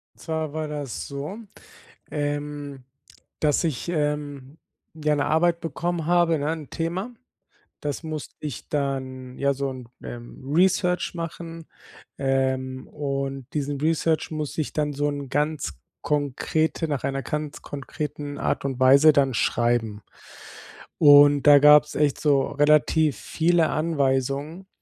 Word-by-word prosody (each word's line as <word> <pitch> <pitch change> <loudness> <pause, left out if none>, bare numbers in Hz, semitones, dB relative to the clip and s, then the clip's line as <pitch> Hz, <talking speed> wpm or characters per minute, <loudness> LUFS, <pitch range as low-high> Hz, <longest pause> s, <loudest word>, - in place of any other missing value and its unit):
Und - - -27
zwar 160 -2 -3
war 155 -1 -3
das 145 -4 -5
so, 145 +10 -6 0.7
ähm, 145 -2 -4 0.6
dass 150 +2 +2
ich, 155 -1 -2
ähm, 150 -3 -3 0.4
ja, 150 -1 0
'ne 145 - 0
Arbeit 170 +2 +2
bekommen 165 +1 -3
habe, 175 -2 +3
ne, 145 +2 -1
'n 155 -4 -7
Thema. 175 +7 -3 0.7
Das 145 +2 -4
musste 155 -2 -6
ich 145 -6 -6
dann 130 -3 -3
ja, 140 0 +2
so 135 0 -2
'n, 125 -2 -9 0.2
ähm, 120 0 -9
Research 180 0 +2
machen. 165 0 -6 0.5
Ähm, 130 -1 -1
und 135 -2 -4
diesen 145 -1 -2
Research 160 0 +1
muss 155 -2 -4
ich 155 - -2
dann 150 -1 -1
so 145 +1 -1
in 145 -1 -4
ganz 150 +1 -1 0.3
konkrete 150 +3 0
nach 145 -3 -2
einer 135 0 -1
ganz 150 +3 -4
konkreten 145 0 -6
Art - - -1
und 135 -2 -2
Weise 140 +4 +7
dann 135 -3 +2
schreiben. 115 -2 0 1.0
Und 145 -2 +7
da 145 -1 +9
gab's 150 +1 +6
echt 145 -2 +1
so 140 -3 +3
relativ 150 +1 +3
viele 165 -1 +2
Anweisungen 145 +2 -1
145 Hz, 135 wpm, -24 LUFS, 135-155 Hz, 1.0 s, da